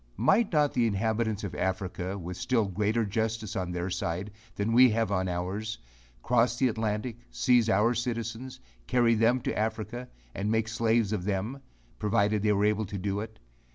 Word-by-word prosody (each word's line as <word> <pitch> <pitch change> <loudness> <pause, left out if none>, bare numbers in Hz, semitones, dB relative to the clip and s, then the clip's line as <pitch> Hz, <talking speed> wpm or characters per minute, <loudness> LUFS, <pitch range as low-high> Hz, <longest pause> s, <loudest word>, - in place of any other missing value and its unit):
Might 195 - +3
not 150 -3 +2
the 120 -2 +2
inhabitants 110 +1 -1
of 100 - -4
Africa, 95 0 -2
with 90 -1 -6
still 120 +1 +1
greater 105 +4 0
justice 110 0 -2
on 90 -3 -2
their 90 +1 -3
side, 90 +2 -3 0.2
than 105 +3 -1
we 125 +2 +7
have 115 -1 0
on 95 -1 0
ours, 95 +5 -3 0.5
cross 120 0 +2
the 130 0 +3
Atlantic, 110 +1 -2
seize 120 -3 +3
our 110 +3 +3
citizens, 115 +1 -4 0.3
carry 120 -2 +3
them 115 +3 +3
into 125 - -3
Africa, 110 +3 -3 0.2
and 100 +2 -2
make 110 0 +1
slaves 115 -1 +1
of 95 -4 -2
them, 105 +7 -2 0.4
provided 105 -1 +2
they 105 0 +2
were 100 0 +2
able 105 0 +1
to 100 - -5
do 100 +1 -2
it? 110 +1 -7
110 Hz, 175 wpm, -28 LUFS, 100-115 Hz, 0.5 s, we